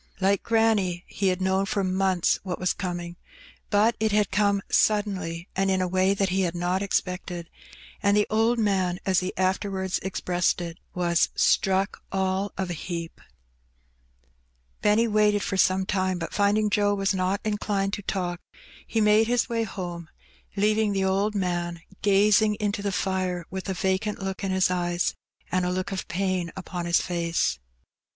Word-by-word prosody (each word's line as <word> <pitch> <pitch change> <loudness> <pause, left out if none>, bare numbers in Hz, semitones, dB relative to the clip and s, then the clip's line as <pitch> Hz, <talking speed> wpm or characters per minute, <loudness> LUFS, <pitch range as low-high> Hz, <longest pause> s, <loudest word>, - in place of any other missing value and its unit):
Like 195 0 +2
granny, 215 -6 +1
he 195 - -2
had 185 0 0
known 190 +1 +1
for 200 -1 0
months 185 -1 +1
what 185 -2 -4
was 180 -1 0
coming, 175 -2 -5 0.5
but 215 +3 +3
it 220 0 +1
had 210 -1 +2
come 200 0 +2
suddenly, 195 -5 +1
and 195 0 +1
in 190 -1 +2
a 185 - 0
way 185 +2 +2
that 195 -1 +1
he 190 +1 +1
had 175 -2 -1
not 175 +2 0
expected, 180 -3 -2 0.5
and 200 +1 +3
the 210 - +4
old 225 +2 +2
man, 190 -5 +1
as 185 -2 +3
he 185 0 -3
afterwards 190 0 0
expressed 180 -2 0
it, 170 0 -6 0.2
was 170 -1 +2
" - - -38
struck 195 +1 +2
all 190 +1 0
of 190 -2 -2
a - - -1
heap/^ 170 0 -5 1.7
Benny 215 +3 +3
waited 210 -1 +2
for 195 - -2
some 190 0 +3
time, 185 -1 0
but 165 -1 -5
finding 210 +1 +2
Joe 205 0 +2
was 195 0 +1
not 190 +1 0
inclined 205 -2 -1
to 205 - -2
talk, 180 -3 -3 0.5
he 225 - 0
made 210 +1 +4
his 245 0 +1
way 230 -1 0
home, 175 -5 -6 0.5
leaving 210 +1 +2
the 195 -1 0
old 200 +3 +1
man 175 -3 -2 0.2
gazing 210 +2 +4
into 205 -1 -2
the 200 0 -1
fire, 185 -2 -1
with 190 +1 -5
a 190 - -1
vacant 190 +3 -1
look 195 0 -5
in 195 - -1
his 185 -1 +2
eyes 175 -1 0 0.4
and 185 0 +1
a 180 - 0
look 185 +1 -2
of 190 - -4
pain 185 -2 -1
upon 180 -2 -5
his 170 - +4
face. 170 - -1
190 Hz, 175 wpm, -26 LUFS, 180-205 Hz, 1.7 s, the